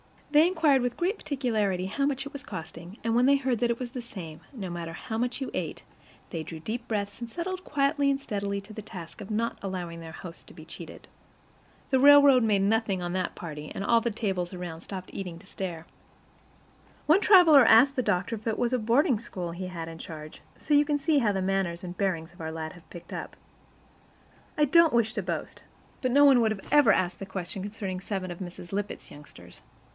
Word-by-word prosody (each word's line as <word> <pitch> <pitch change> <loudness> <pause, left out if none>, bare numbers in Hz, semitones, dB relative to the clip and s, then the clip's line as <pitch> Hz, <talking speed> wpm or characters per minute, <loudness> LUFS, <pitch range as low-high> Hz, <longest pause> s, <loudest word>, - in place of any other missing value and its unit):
They 305 +2 +6
inquired 315 -7 +3
with 245 0 -2
great 380 +5 0
particularity 215 -10 -1
how 275 +8 -1
much 270 -1 -2
it 280 - -7
was 280 - -6
costing, 175 - -8
and 230 0 0
when 245 +1 +4
they 280 - +6
heard 260 -4 0
that 240 0 +1
it 235 - 0
was 250 -2 -5
the 250 - -5
same, 170 -9 -9
no 200 -8 -5
matter 170 -1 -5
how 220 +7 -5
much 245 +3 -2
you 265 - -3
ate, - - -4 0.5
they 165 - -3
drew 160 0 -7
deep 235 +8 -5
breaths 205 -3 -3
and 235 -1 -6
settled 365 +6 -4
quietly 280 0 +1
and 275 0 +1
steadily 200 -5 -3
to 200 +2 -14
the 215 - -6
task 175 -6 -10
of - - -8
not 225 +2 -1
allowing 180 -3 -5
their 165 -1 -9
host 170 0 -10
to - - -13
be - - -11
cheated. - - -11 0.8
The 265 - +4
railroad 280 -2 +8
made 210 -3 +3
nothing 205 -2 +1
on 175 0 -3
that 185 -1 -2
party, 150 -3 -7
and - - -3
all 230 +3 +4
the 235 - 0
tables 190 -5 -2
around 175 -3 -6
stopped 185 0 -8
eating 180 -4 -5
to 200 - -16
stare. 175 -4 -6 1.2
One 315 +6 +5
traveler 335 - +8
asked 265 +6 +6
the - - +3
doctor 185 0 0
if 215 - -10
it 220 - 0
was 240 0 0
a 250 - +2
boarding 235 - +3
school 180 -7 -6
he 185 +2 -5
had 165 -3 -6
in 165 - -9
charge; 155 -2 -9
so 300 - -2
you 290 0 +6
can 295 -1 +1
see 300 0 +2
how 215 -5 +2
the 190 -1 -1
manners 185 -2 -1
and 180 0 -6
bearing 185 -5 0
of 175 +2 -17
our 160 0 -4
lads 160 0 -5
have 175 - -17
picked 170 - -11
up. - - -6 1.2
I 300 - +4
don't 330 +1 +5
wish 230 -2 +2
to - - -2
boast, - - -5 0.4
but 255 - +1
no 285 +3 +5
one 275 -3 +7
would 220 -3 +1
ever 290 -8 +6
have 185 - +3
asked 175 - -10
such 195 - -6
a - - -20
question 190 0 -5
concerning 200 -2 -4
seven 190 -2 -4
of 175 - -8
Mrs. 175 -2 -8
Lippett's 205 +1 -4
youngsters. 145 0 -14
210 Hz, 225 wpm, -28 LUFS, 180-260 Hz, 1.2 s, railroad